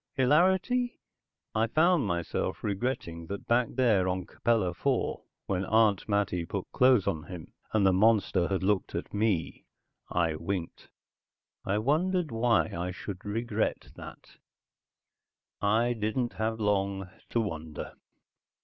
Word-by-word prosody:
Hilarity? 190 Hz, -, +2 dB, 0.5 s
I 110 Hz, +1 st, +2 dB
found 160 Hz, -, +3 dB
myself 85 Hz, -2 st, -2 dB
regretting 100 Hz, -6 st, -3 dB
that 100 Hz, +2 st, -6 dB
back 120 Hz, 0 st, +2 dB
there 110 Hz, -8 st, +2 dB
on 90 Hz, 0 st, -2 dB
Capella 115 Hz, -6 st, 0 dB
IV, 85 Hz, -, -1 dB, 0.3 s
when 95 Hz, -1 st, -1 dB
Aunt 110 Hz, 0 st, +2 dB
Mattie 100 Hz, -4 st, +1 dB
put 90 Hz, +3 st, -4 dB
clothes 125 Hz, -6 st, +4 dB
on 85 Hz, -5 st, -2 dB
him, 90 Hz, -4 st, -9 dB, 0.2 s
and 105 Hz, -3 st, +2 dB
the 95 Hz, -, +5 dB
monster 100 Hz, -3 st, +3 dB
had 95 Hz, -1 st, -1 dB
looked 100 Hz, 0 st, 0 dB
at -, -, -5 dB
me, 105 Hz, -7 st, -1 dB, 0.4 s
I 85 Hz, -2 st, +1 dB
winked. 85 Hz, +1 st, -5 dB, 0.8 s
I 100 Hz, +2 st, +1 dB
wondered 160 Hz, -, +1 dB
why 115 Hz, 0 st, +2 dB
I 90 Hz, +2 st, -2 dB
should 95 Hz, +1 st, -7 dB
regret 110 Hz, +1 st, -2 dB
that. -, -, -12 dB, 1.2 s
I 115 Hz, +4 st, +2 dB
didn't 115 Hz, +2 st, -2 dB
have 110 Hz, +1 st, -2 dB
long 100 Hz, -2 st, 0 dB, 0.2 s
to 120 Hz, -, 0 dB
wonder. 80 Hz, -8 st, -5 dB
105 Hz, 130 wpm, -29 LUFS, 95-120 Hz, 1.2 s, the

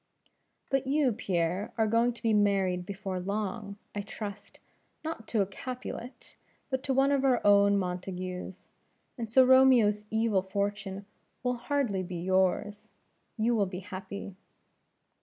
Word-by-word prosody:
"But 270 Hz, -1 st, +1 dB
you, 275 Hz, -3 st, +2 dB
Pierre, 185 Hz, -1 st, -1 dB
are 220 Hz, -, +3 dB
going 230 Hz, +3 st, +3 dB
to 235 Hz, -, -14 dB
be 225 Hz, -1 st, +3 dB
married 195 Hz, -3 st, +2 dB
before 195 Hz, -2 st, -4 dB
long, 200 Hz, +1 st, -3 dB, 0.2 s
I 205 Hz, -, -2 dB
trust, 205 Hz, 0 st, -8 dB, 0.4 s
not 315 Hz, -9 st, -5 dB
to 215 Hz, -4 st, +2 dB
a -, -, -3 dB
Capulet, 250 Hz, +4 st, -8 dB, 0.3 s
but 260 Hz, 0 st, 0 dB
to 270 Hz, -, +1 dB
one 270 Hz, +1 st, +4 dB
of 275 Hz, -1 st, +2 dB
our 260 Hz, -3 st, +4 dB
own 200 Hz, 0 st, +6 dB
Montagues; 185 Hz, 0 st, -5 dB, 0.4 s
and 230 Hz, -3 st, -5 dB
so 260 Hz, +3 st, +6 dB
Romeo's 250 Hz, -5 st, +5 dB
evil 220 Hz, -3 st, +2 dB
fortune 200 Hz, +1 st, -3 dB, 0.4 s
will 250 Hz, 0 st, +1 dB
hardly 240 Hz, -6 st, 0 dB
be 180 Hz, 0 st, -6 dB
yours. 190 Hz, +3 st, 0 dB, 0.5 s
You 230 Hz, +2 st, +2 dB
will 205 Hz, -4 st, +2 dB
be 185 Hz, 0 st, -6 dB
happy." 190 Hz, 0 st, -7 dB
205 Hz, 140 wpm, -29 LUFS, 190-240 Hz, 0.5 s, own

